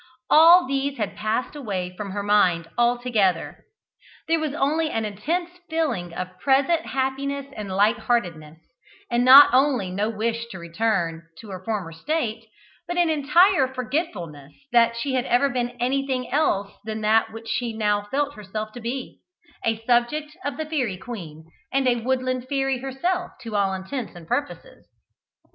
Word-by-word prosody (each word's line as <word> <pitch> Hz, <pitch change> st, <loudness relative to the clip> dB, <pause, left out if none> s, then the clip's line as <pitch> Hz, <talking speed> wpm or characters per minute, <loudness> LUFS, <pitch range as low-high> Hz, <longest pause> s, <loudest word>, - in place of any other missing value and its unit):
All 335 Hz, +3 st, +8 dB
these 275 Hz, +1 st, -2 dB
had 210 Hz, -4 st, -3 dB
passed 215 Hz, +6 st, -2 dB
away 190 Hz, -10 st, -4 dB
from 205 Hz, 0 st, -6 dB
her 200 Hz, +1 st, -4 dB
mind 185 Hz, -5 st, +3 dB
altogether. 240 Hz, -7 st, +1 dB, 0.6 s
There 325 Hz, 0 st, +2 dB
was 305 Hz, -2 st, -3 dB
only 310 Hz, +3 st, +1 dB
an 225 Hz, -5 st, -2 dB
intense 325 Hz, -, -2 dB, 0.2 s
feeling 275 Hz, -, -1 dB
of 185 Hz, +1 st, -7 dB
present 280 Hz, +5 st, +2 dB
happiness 270 Hz, +1 st, -2 dB
and 205 Hz, -2 st, -6 dB
light 210 Hz, +4 st, +2 dB
heartedness, 170 Hz, -10 st, -2 dB, 0.5 s
and 240 Hz, +1 st, +2 dB
not 265 Hz, +1 st, +9 dB
only 255 Hz, -8 st, +2 dB
no 205 Hz, +4 st, -1 dB
wish 230 Hz, +1 st, -2 dB
to 195 Hz, -, -9 dB
return 170 Hz, -2 st, -2 dB
to 210 Hz, +2 st, -11 dB
her 185 Hz, -1 st, -7 dB
former 200 Hz, -7 st, -3 dB
state, 225 Hz, -, -3 dB, 0.4 s
but 350 Hz, 0 st, -3 dB
an 345 Hz, -2 st, +3 dB
entire 305 Hz, +1 st, +4 dB
forgetfulness 215 Hz, -, -4 dB, 0.2 s
that 235 Hz, -1 st, +4 dB
she 265 Hz, +3 st, -2 dB
had 255 Hz, -2 st, 0 dB
ever 265 Hz, +3 st, +3 dB
been 245 Hz, -1 st, -3 dB
anything 260 Hz, 0 st, -1 dB
else 205 Hz, -10 st, +1 dB
than 220 Hz, 0 st, -5 dB
that 220 Hz, +1 st, +3 dB
which 225 Hz, +1 st, -10 dB
she 235 Hz, +1 st, -1 dB
now 210 Hz, -2 st, 0 dB
felt 285 Hz, +2 st, -1 dB
herself 215 Hz, 0 st, -6 dB
to 245 Hz, -, -10 dB
be 250 Hz, +3 st, -5 dB, 0.4 s
a 225 Hz, 0 st, -1 dB
subject 255 Hz, +6 st, +1 dB
of 285 Hz, -2 st, -3 dB
the 315 Hz, -, -3 dB
Fairy 260 Hz, -11 st, -2 dB
Queen, 170 Hz, -8 st, -9 dB, 0.3 s
and 270 Hz, -1 st, +1 dB
a 245 Hz, -1 st, +3 dB
woodland 255 Hz, +1 st, -1 dB
fairy 270 Hz, -2 st, 0 dB
herself 345 Hz, +8 st, -2 dB
to 225 Hz, -2 st, -6 dB
all 200 Hz, -1 st, +2 dB
intents 190 Hz, +3 st, -5 dB
and 170 Hz, -2 st, -12 dB
purposes. 290 Hz, -, -4 dB
240 Hz, 160 wpm, -24 LUFS, 205-275 Hz, 0.6 s, not